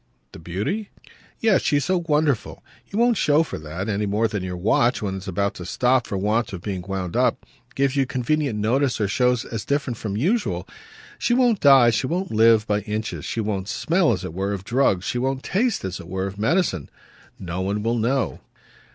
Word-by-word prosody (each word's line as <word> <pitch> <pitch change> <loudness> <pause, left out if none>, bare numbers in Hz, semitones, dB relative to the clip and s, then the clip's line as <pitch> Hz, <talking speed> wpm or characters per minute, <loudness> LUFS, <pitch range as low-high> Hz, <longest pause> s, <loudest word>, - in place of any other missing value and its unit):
"The - - -11
beauty 105 - -3 0.3
?" - - -29
"Yes, 220 -4 +4
she's 145 -2 +1
so 185 -2 +1
wonderful. 150 -5 0 0.3
She - - -8
won't 235 -1 +3
show 150 0 +3
for 160 - -6
that, 80 +6 -5
any 105 -1 -1
more 105 +3 +1
than 105 -3 -3
your 90 -1 -4
watch, 110 +6 +2
when 95 -2 -2
it's 95 +1 -9
about 100 +2 -1
to 90 - -8
stop 125 +3 +2
for 100 - -3
want 105 +3 0
of 90 -2 -7
being 95 -3 -3
wound 95 -1 -4
up, - - +1 0.3
gives 135 0 +1
you 135 -2 +2
convenient 130 0 -1
notice 125 +5 +1
or 105 - +1
shows 125 +3 +1
as 115 -3 -5
different 140 -4 -1
from 105 -2 -4
usual. 205 - 0 0.5
She 240 - +2
won't 245 -5 +3
die, 135 -4 +7
she 125 +3 0
won't 180 +4 -2
live, 110 0 +5
by 105 -2 +1
inches. 105 +2 -4
She 115 - -2
won't 100 -3 -2
smell, 170 -1 +2
as 95 -5 -2
it - - -6
were, 100 +3 -2
of 95 -2 -5
drugs. 105 -5 +1
She 125 - -1
won't 135 +1 -1
taste, 220 - 0
as 95 -1 -4
it - - -10
were, 95 +1 -3
of 100 +1 -6
medicine. 115 - 0 0.5
No 90 0 -4
one 100 +2 -2
will 115 +1 0
know." 130 +4 0
115 Hz, 210 wpm, -23 LUFS, 100-140 Hz, 0.5 s, die